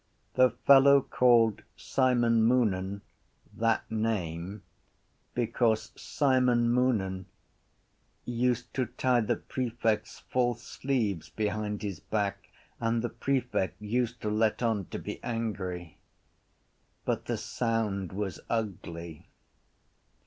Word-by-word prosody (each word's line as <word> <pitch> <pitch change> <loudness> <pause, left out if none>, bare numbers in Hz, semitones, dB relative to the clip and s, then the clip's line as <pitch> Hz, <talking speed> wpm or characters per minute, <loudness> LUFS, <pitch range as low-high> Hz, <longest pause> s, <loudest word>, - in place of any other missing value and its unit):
The 130 0 +5 0.2
fellow 140 0 +8
called 115 -4 +4 0.2
Simon 120 -3 +2
Moonan 100 -5 +1 0.5
that 115 0 +1
name 100 -3 -2 0.7
because 115 -2 +1
Simon 125 -4 +2
Moonan 100 -7 +1 1.0
used 120 0 -1
to 130 -2 0
tie 125 0 +1
the 110 - +1
prefect’s 115 -4 -2
false 120 -1 0
sleeves 105 - -2
behind 105 +2 -2
his 100 -3 -4
back 100 -2 -2 0.3
and 115 0 0
the 120 - -1
prefect 125 -8 -1
used 120 +2 -1
to 105 - -1
let 110 +2 +1
on 110 -5 +1
to - - -6
be - - -6
angry. 95 -8 -4 1.1
But - - -1
the - - -1
sound 110 -6 -1
was 95 -1 -4
ugly. 85 -7 -4
115 Hz, 105 wpm, -29 LUFS, 100-125 Hz, 1.1 s, fellow